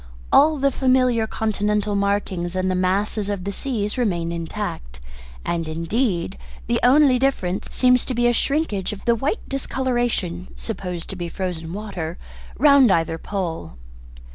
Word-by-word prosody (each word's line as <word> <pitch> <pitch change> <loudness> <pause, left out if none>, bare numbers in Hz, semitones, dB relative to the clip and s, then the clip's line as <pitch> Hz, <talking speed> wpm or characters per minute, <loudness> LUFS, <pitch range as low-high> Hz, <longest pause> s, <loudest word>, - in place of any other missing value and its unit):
All 305 +2 +6
the 275 0 +2
familiar 255 -4 +2
continental 210 -1 0
markings 200 -3 -1
and 185 0 0
the - - +1
masses 195 +3 0
of 200 -3 -2
the 200 - -3
seas 215 0 -2
remain 170 -8 0
intact, 65 - -5 0.5
and 165 -2 -1
indeed 170 - -1 0.3
the - - +1
only 265 0 +5
difference 200 -9 0
seems 250 -1 +3
to 255 - -3
be 240 +1 +2
a 240 - +4
shrinkage 235 - 0
of 200 - -10
the 235 - +4
white 270 - -2
discolouration 240 -10 -1
(supposed 180 -6 -5
to - - -5
be 175 -2 -4
frozen 165 -3 -4
water) 185 -5 -5 0.4
round 280 -4 +6
either 165 -2 +1
pole." 170 - -4
205 Hz, 145 wpm, -22 LUFS, 175-250 Hz, 0.5 s, All